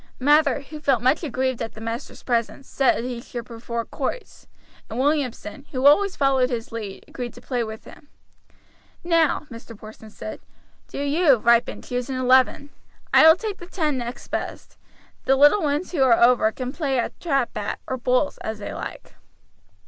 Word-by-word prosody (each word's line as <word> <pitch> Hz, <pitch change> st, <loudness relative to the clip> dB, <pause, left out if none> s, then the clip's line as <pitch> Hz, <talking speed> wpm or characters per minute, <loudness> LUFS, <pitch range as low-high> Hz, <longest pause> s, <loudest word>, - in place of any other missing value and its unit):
Mather, 295 Hz, +2 st, +3 dB
who 300 Hz, +2 st, -10 dB
felt 270 Hz, -6 st, +1 dB
much 260 Hz, +5 st, +3 dB
aggrieved 260 Hz, -3 st, -2 dB
at 225 Hz, -, -4 dB
the -, -, -10 dB
master's 230 Hz, +2 st, -6 dB
presence, 240 Hz, +2 st, -2 dB
said 265 Hz, -4 st, +1 dB
he 245 Hz, -1 st, -5 dB
should 240 Hz, -2 st, -7 dB
prefer 235 Hz, 0 st, -5 dB
quoits; 285 Hz, -, -6 dB, 0.4 s
and 225 Hz, -, -6 dB
Williamson, 275 Hz, -3 st, -1 dB
who 260 Hz, 0 st, -2 dB
always 370 Hz, +7 st, +5 dB
followed 265 Hz, -2 st, +2 dB
his 235 Hz, -3 st, -4 dB
lead, 215 Hz, -4 st, -7 dB
agreed 245 Hz, -2 st, -7 dB
to -, -, -11 dB
play 245 Hz, -3 st, -2 dB
with 220 Hz, 0 st, -8 dB
him. 290 Hz, -, -15 dB, 1.0 s
"Now," 330 Hz, -3 st, +2 dB
Mr. 230 Hz, -1 st, -10 dB
Porson 215 Hz, +1 st, -12 dB
said, 215 Hz, +1 st, -8 dB, 0.5 s
"do -, -, -9 dB
you, 285 Hz, +1 st, +4 dB
Ripon, 235 Hz, +1 st, +2 dB
choose 250 Hz, +1 st, -4 dB
an 265 Hz, -, -2 dB
eleven. 260 Hz, +3 st, +3 dB, 0.4 s
I -, -, +8 dB
will 320 Hz, +2 st, +8 dB
take 420 Hz, 0 st, -5 dB
the 350 Hz, -, -10 dB
ten 315 Hz, -6 st, -1 dB
next 240 Hz, +1 st, -7 dB
best. -, -, -5 dB, 0.5 s
The 270 Hz, -, +4 dB
little 290 Hz, +9 st, +5 dB
ones 300 Hz, +3 st, -1 dB
who 320 Hz, -7 st, -1 dB
are 250 Hz, -3 st, +5 dB
over 235 Hz, -2 st, +4 dB
can 255 Hz, +2 st, -5 dB
play 285 Hz, -5 st, -1 dB
at 235 Hz, -, -3 dB
trap 275 Hz, -7 st, 0 dB
bat, 205 Hz, -1 st, -3 dB
or 260 Hz, -, -2 dB
bowls, 250 Hz, +3 st, 0 dB
as 220 Hz, 0 st, -5 dB
they 210 Hz, -, -6 dB
like." -, -, -8 dB
255 Hz, 180 wpm, -23 LUFS, 235-290 Hz, 1.0 s, I